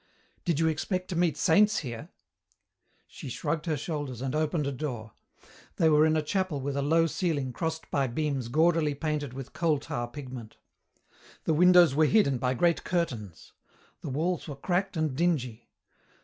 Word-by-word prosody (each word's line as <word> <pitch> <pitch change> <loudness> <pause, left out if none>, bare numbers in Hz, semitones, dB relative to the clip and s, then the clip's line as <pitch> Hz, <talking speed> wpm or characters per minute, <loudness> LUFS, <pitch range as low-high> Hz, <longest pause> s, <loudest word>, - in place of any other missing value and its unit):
"Did 170 -5 +1
you 165 - +3
expect 180 +4 -2
to 180 - -3
meet 170 -3 +1
saints 210 +5 +4
here?" 120 -2 -7 1.0
She - - -9
shrugged 160 0 -3
her 155 -2 0
shoulders 145 -5 -4
and 130 +1 -3
opened 155 0 0
a 140 - -1
door. 125 -6 -5 0.6
They 160 - +3
were 155 0 +5
in 155 0 +2
a 155 - 0
chapel 185 -2 -1
with 140 +1 -3
a 140 - 0
low 165 +4 +3
ceiling 150 -6 -1
crossed 160 +2 -4
by 140 -2 +1
beams 135 -1 -2
gaudily 155 +2 +2
painted 150 -3 -3
with 135 0 -8
coal 165 -3 +1
tar 120 -3 -4
pigment. 125 -3 -9 0.9
The 160 - +1
windows 180 -1 +6
were 155 +2 +4
hidden 140 - +3
by 125 0 0
great 170 +5 +2
curtains. 120 - -3 0.5
The - - -5
walls 165 +8 -1
were 145 - -6
cracked 180 +5 -1
and 155 -4 0
dingy. 130 -8 -1
150 Hz, 170 wpm, -28 LUFS, 135-165 Hz, 1.0 s, windows